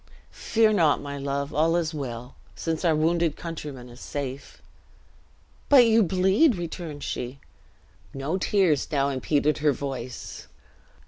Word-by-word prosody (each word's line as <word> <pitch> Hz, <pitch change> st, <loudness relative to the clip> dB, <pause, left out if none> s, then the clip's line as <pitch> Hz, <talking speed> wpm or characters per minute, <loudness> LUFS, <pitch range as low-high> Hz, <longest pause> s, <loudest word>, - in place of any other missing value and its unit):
"Fear 220 Hz, -1 st, +2 dB
not, 165 Hz, -7 st, +3 dB
my 140 Hz, 0 st, -6 dB
love! 140 Hz, +1 st, -3 dB
all 160 Hz, +3 st, +2 dB
is 165 Hz, -2 st, 0 dB
well, 125 Hz, -4 st, -6 dB, 0.2 s
since 165 Hz, 0 st, -3 dB
our 165 Hz, -3 st, +3 dB
wounded 165 Hz, 0 st, +1 dB
countryman 150 Hz, -7 st, -7 dB
is 120 Hz, +1 st, -13 dB
safe." 140 Hz, -1 st, -6 dB, 1.1 s
"But 265 Hz, -4 st, +8 dB
you, 225 Hz, 0 st, +5 dB
bleed!" 190 Hz, -, +3 dB
returned 170 Hz, -4 st, -6 dB
she. 125 Hz, +3 st, -4 dB, 0.7 s
No 140 Hz, +7 st, -3 dB
tears 185 Hz, -8 st, +2 dB
now 140 Hz, -2 st, +1 dB
impeded 145 Hz, +3 st, 0 dB
her 150 Hz, 0 st, +3 dB
voice. 130 Hz, -3 st, -6 dB
150 Hz, 130 wpm, -25 LUFS, 140-175 Hz, 1.1 s, But